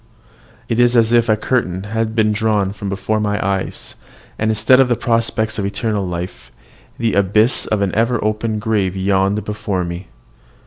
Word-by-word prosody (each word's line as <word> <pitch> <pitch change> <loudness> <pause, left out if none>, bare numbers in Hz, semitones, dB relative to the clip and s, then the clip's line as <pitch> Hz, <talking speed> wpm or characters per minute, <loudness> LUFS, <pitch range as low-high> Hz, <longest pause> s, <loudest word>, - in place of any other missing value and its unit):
It 115 0 -1
is 120 0 +4
as 115 0 +3
if 115 -1 +3
a 110 - +4
curtain 95 -6 -1
had 110 +1 -2
been 110 -2 +3
drawn 105 -2 0
from 100 -1 -6
before 100 +3 -1
my 105 -1 -1
eyes, 95 -1 -3 0.5
and, 110 - +1
instead 125 +4 +4
of 125 -3 +3
prospects 115 -2 0
of 100 - -1
eternal 100 -1 -2
life, 90 +1 -6 0.5
the 115 -1 0
abyss 105 +5 +2
of 105 -2 0
an 95 - -1
ever 115 +2 +1
open 110 +1 -1
grave 105 -4 0
yawned 95 +2 +1
before 105 -3 -2
me. 85 +1 -6
105 Hz, 170 wpm, -18 LUFS, 100-115 Hz, 0.5 s, is